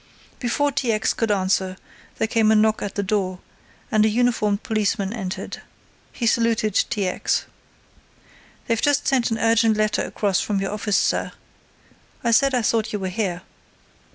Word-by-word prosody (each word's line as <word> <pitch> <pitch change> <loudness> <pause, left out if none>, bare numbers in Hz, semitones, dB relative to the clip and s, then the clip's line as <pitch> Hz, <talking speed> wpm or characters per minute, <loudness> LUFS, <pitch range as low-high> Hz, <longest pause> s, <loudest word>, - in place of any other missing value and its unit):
Before 285 +4 0
T. 250 -4 0
X. 215 -1 +1
could 225 - -1
answer 190 -1 0 0.4
there 220 - 0
came 220 -1 +2
a - - +5
knock 215 0 +3
at 200 - -4
the 200 - -1
door, 190 -2 -1 0.5
and 215 -2 +4
a 220 - +4
uniformed 215 -3 +1
policeman, 210 -2 -1
entered. 195 -4 -5 0.5
He 240 - -4
saluted 230 -2 +2
T. 205 -5 0
X. 180 - -1 1.2
"They've 230 -1 0
just 290 0 +2
sent 260 -3 +2
an 225 - -1
urgent 225 -1 +3
letter 215 0 +1
across 200 -3 0
from 205 -2 -1
your 195 0 -2
office, 210 -1 0
sir. - - 0 0.9
I 235 - +2
said 270 +3 +4
I 245 - +1
thought 220 0 +1
you 210 - -2
were 190 -2 -3
here." 185 -2 -3
215 Hz, 165 wpm, -22 LUFS, 200-230 Hz, 1.2 s, a